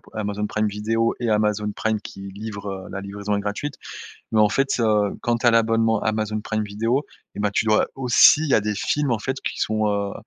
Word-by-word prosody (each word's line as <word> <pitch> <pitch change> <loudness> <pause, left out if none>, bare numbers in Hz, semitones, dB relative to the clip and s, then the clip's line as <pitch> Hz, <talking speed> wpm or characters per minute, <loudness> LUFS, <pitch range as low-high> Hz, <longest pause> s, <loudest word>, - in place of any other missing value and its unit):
Amazon 105 -1 -2
Prime 110 0 0
Video 115 +3 0
et 120 -2 0
Amazon 105 0 +1
Prime 110 -1 -1
qui 100 - -10
livre, 100 0 -6
heu 95 -1 -7
la 100 - -5
livraison 100 +1 -3
est - - -1
gratuite, 105 +8 -4 0.6
mais 110 - +4
en 105 - +5
fait, 135 +1 0
heu, 105 -2 +2
quand 120 0 +1
tu 120 - -1
as - - +7
l'abonnement 115 -1 +2
Amazon 110 0 -1
Prime 110 0 -2
Video 115 +7 -1 0.3
et - - -4
bah, 105 - +1
tu 110 - 0
dois 110 0 +3
aussi, 130 +3 +6
il 160 - -2
y - - +4
a - - +4
des 105 0 -1
films, 140 +5 0
en 110 - 0
fait, 130 +3 -3
qui - - -4
sont, 110 0 +1
heu, 100 -1 -1
110 Hz, 230 wpm, -23 LUFS, 105-115 Hz, 0.6 s, as